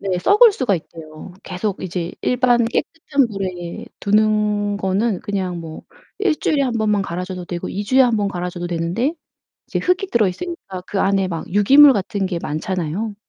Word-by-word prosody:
네, 190 -2 -1
썩을 420 - +6
수가 250 - 0
있대요. 160 +1 -11
계속 195 +2 -4
이제 175 -1 -4
일반 245 -1 +3
깨끗한 280 +2 0
물에 185 -4 -5 0.2
두는 210 0 +1
거는 195 +1 0
그냥 185 -3 -3
뭐 160 -1 -9 0.4
1 390 -6 +2
주일에 290 -2 +1
1 255 -3 0
번만 210 -2 +1
갈아줘도 180 0 -5
되고 175 0 -5
2 205 +2 -4
주에 260 +6 +3
1 245 -3 +4
번 205 -1 0
갈아줘도 180 -2 -4
되는데 175 - -1 0.6
이제 - - -1
흙이 365 +2 0
들어 225 -3 +3
있으니까 195 - -6
그 200 - -3
안에 195 -1 +1
막 165 -3 -5
유기물 270 +9 +7
같은 200 -2 -2
게 180 -2 -3
많잖아요. 185 +6 -3
200 Hz, 320 characters per minute, -20 LUFS, 180-235 Hz, 0.6 s, 유기물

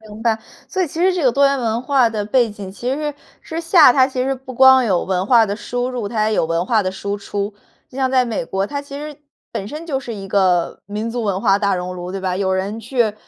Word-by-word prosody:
明 215 0 -12
白， 225 -2 +2 0.3
所 375 - -1
以 - - 0
其 320 +2 -6
实 370 +1 +4
这 355 - -1
个 260 - +4
多 280 +2 +4
元 275 0 +1
文 230 -1 -1
化 255 -3 +3
的 215 -2 -3
背 235 +2 +2
景 200 -2 -8
其 245 +6 -3
实 295 +1 -3 0.3
之 325 +1 -5
下 330 -5 +6
它 260 0 +4
其 260 -1 -3
实 270 +1 0
不 260 0 -10
光 260 +1 +7
有 190 -6 +1
文 185 -1 -1
化 230 -1 +5
的 200 - -2
输 245 +2 -3
入， 240 -5 -4
它 215 -1 0
也 220 - 0
有 - - +2
文 165 +2 -1
化 220 -1 +2
的 185 - -1
输 200 +2 -4
出。 200 0 -4 0.3
就 - - -14
像 260 -1 +1
在 260 -1 +3
美 230 -7 -3
国， 195 +3 -2
它 285 +4 -4
其 280 0 -9
实 300 0 -7 0.4
本 195 - -4
身 310 +7 -7
就 275 -5 -2
是 240 -3 -7
一 195 -2 -7
个 185 -3 +1
民 210 +3 -4
族 240 0 -3
文 195 -3 -1
化 195 -3 +3
大 200 -2 +1
熔 180 0 -4
炉， 180 0 -6
对 195 +1 -4
吧？ 185 -1 -2
有 190 -1 0
人 195 +4 -2
去， 230 -2 0
225 Hz, 290 characters per minute, -19 LUFS, 200-265 Hz, 0.4 s, 光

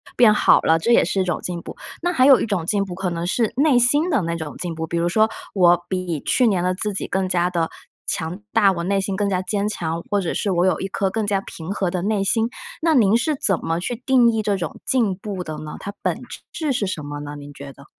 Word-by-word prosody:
变 230 -3 +6
好 - - +5
了， 165 0 +3
这 235 - 0
也 - - +5
是 195 - 0
一 - - +2
种 175 - -2
进 175 -1 -4
步。 - - -10 0.2
那 350 +1 0
还 260 -6 +3
有 270 -2 +7
一 - - -1
种 185 -6 -1
进 200 +1 +1
步 180 -2 -7
可 185 -1 -2
能 170 +1 -3
是 225 +3 0
内 280 -2 +4
心 290 +8 +3
的 285 - +2
那 170 0 -2
种 160 -3 -6
进 175 -2 -4
步， 160 0 -4
比 170 - -2
如 170 +1 +1
说 220 +5 +3 0.2
我 175 -2 +4
比 185 -4 -2
去 250 - +2
年 185 -5 +1
的 185 0 +1
自 205 +2 -3
己 - - -3
更 190 -1 -1
加 180 0 +1
得 165 -2 0 0.4
强 165 +4 -3
大， 205 -4 +4
我 170 -2 -3
内 195 +2 +1
心 195 0 -2
更 200 0 0
加 185 -2 0
坚 205 +1 -1
强， 165 -5 -3
或 205 - +1
者 180 -4 -2
是 205 - -1
我 175 0 +2
有 185 - +2
一 195 - -3
颗 195 0 -1
更 220 -1 -2
加 200 -2 +1
平 170 -1 -8
和 190 -3 -1
的 180 -2 -2
内 205 0 0
心。 225 +3 +1 0.3
那 325 -2 +3
您 220 -3 +4
是 300 +5 +1
怎 195 -8 0
么 165 +1 -1
去 240 +7 -3
定 250 -3 +4
义 220 -1 0
这 205 -2 0
种 170 -4 -5
进 225 -8 +1
步 195 -2 -5
的 155 -2 -6
呢， 155 0 -7
它 200 - -6
本 - - -1 0.3
质 305 -5 -2
是 205 -5 -1
什 160 -5 -4
么 145 0 -6
呢？ 145 0 -7
您 145 0 -10
觉 140 0 -9
得？ 140 +1 -16
190 Hz, 290 characters per minute, -21 LUFS, 170-220 Hz, 0.4 s, 有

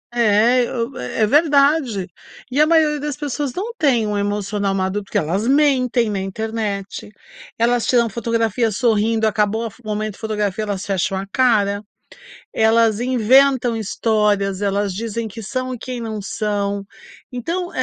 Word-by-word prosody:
É, 235 +2 +4
e - - -6
o 235 +2 -3
é 125 - -1
verdade. 280 - +3 0.4
E 280 +4 +2
a 305 - +5
maioria 310 -2 +3
das 290 -1 -4
pessoas 290 -1 -3
não 430 +6 -4
tem 250 -7 +2
um 210 -1 -2
emocional 205 0 -1
maduro, 190 +2 -1
porque - - -3
elas 190 +8 -1
mentem 260 -4 +3
na 200 - -2
internet, 205 0 -4 0.5
elas 235 +1 +2
tiram 240 -2 +3
fotografia 230 +1 0
sorrindo 220 0 +1
acabou 215 +1 0
a 225 - -5
fo 245 - -21
o - - -12
momento 215 -1 -3
fotografia 210 -2 -2
elas 200 -1 -4
fecham 195 -1 -1
a 195 - -4
cara. 205 -6 +2 0.7
Elas 225 -1 +3
inventam 255 0 +3
histórias, 210 -2 0
elas 200 -1 0
dizem 230 +2 -4
que 220 +3 -9
são 255 +4 -3
e - - -5
quem 250 +1 -6
não 220 -2 -4
são. 200 -1 -2 0.5
Então 335 +9 -3
225 Hz, 155 wpm, -20 LUFS, 205-250 Hz, 0.7 s, a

